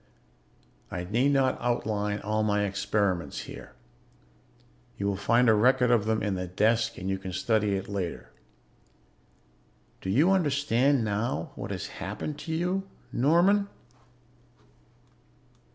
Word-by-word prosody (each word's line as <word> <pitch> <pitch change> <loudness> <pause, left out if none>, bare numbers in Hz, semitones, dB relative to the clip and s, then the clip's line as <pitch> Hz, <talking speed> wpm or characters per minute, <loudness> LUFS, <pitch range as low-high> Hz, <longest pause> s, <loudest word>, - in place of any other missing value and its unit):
"I 90 0 -4
need 115 +9 +1
not 135 -2 +1
outline 105 -4 -1
all 110 0 -1
my 105 -1 +1
experiments 100 -2 -1
here. - - -10 1.2
You 100 - -3
will 100 0 0
find 115 +5 +3
a 110 - +6
record 125 +3 +4
of 115 -4 +3
them 110 -1 0
in 105 -2 0
the 90 -1 -3
desk 110 +5 +1
and 95 - -5
you 95 0 -1
can 95 -1 -6
study 105 +2 +1
it 95 0 -4
later. 85 -11 -4 1.7
"Do 95 - -5
you 145 - +4
understand 140 -6 +2
now 100 -6 -2
what - - -7
has - - -4 0.2
happened 105 +10 -5
to 160 - -6
you, 180 +4 -1 0.2
Norman?" 175 +10 +3
110 Hz, 130 wpm, -28 LUFS, 100-135 Hz, 1.7 s, a